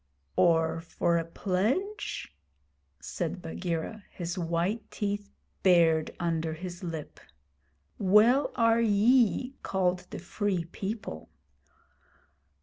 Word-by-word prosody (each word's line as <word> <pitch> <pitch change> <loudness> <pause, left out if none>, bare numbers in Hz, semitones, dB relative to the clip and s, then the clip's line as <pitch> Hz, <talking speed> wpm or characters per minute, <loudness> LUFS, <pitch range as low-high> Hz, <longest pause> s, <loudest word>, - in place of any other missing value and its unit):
'Or 165 -1 +3
for 170 0 0
a 165 - 0
pledge?' 215 - -2 0.7
said - - -4
Bagheera, 165 - -4
his 175 0 -5
white 175 +5 -1
teeth 205 -1 -3 0.3
bared 165 -4 +4
under 165 -2 -1
his 175 +3 -7
lip. 165 -4 -6 0.8
'Well 215 +8 +5
are 230 -1 +4
ye 235 +4 +3
called 180 -1 0
the - - -6
Free 185 -1 -2
People!' 190 - -6
185 Hz, 95 wpm, -29 LUFS, 165-215 Hz, 0.8 s, Well